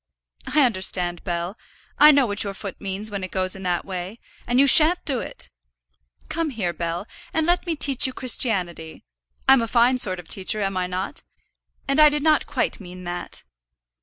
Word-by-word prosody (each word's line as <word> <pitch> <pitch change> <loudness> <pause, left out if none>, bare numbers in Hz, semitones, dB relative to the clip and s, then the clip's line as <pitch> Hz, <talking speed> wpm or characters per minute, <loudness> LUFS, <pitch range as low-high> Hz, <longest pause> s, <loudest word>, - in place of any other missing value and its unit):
"I 305 - +5
understand, 185 -6 -1
Bell. 175 +1 -4 0.4
I 300 +1 +8
know 280 -3 +4
what 205 -2 -1
your 200 -1 -6
foot 195 -2 -9
means 200 +2 -4
when 200 -2 -5
it 185 - -5
goes 185 0 +1
in 190 - -10
that 180 -2 -2
way; 185 +2 -6 0.3
and 245 +1 +1
you 280 - +6
shan't 325 +4 +7
do 265 -4 -1
it. - - -9 0.8
Come 330 -1 -2
here, 200 -10 -3
Bell, 170 +3 -4 0.3
and 320 -1 +1
let 350 +1 0
me 335 - -1
teach 275 -3 +2
you - - -5
Christianity. 185 -11 -1 0.4
I'm 265 -2 +6
a 230 - -2
fine 245 +2 +2
sort 185 -7 +2
of 175 - -12
teacher, 195 +4 -2
am 195 -2 -2
I 180 -1 -2
not? 185 +2 -4 0.7
And 275 +2 +1
I 305 0 +8
did 295 0 -2
not 310 -1 +2
quite - - -2
mean 180 -2 -11
that." 175 0 -6
205 Hz, 190 wpm, -22 LUFS, 180-270 Hz, 0.8 s, I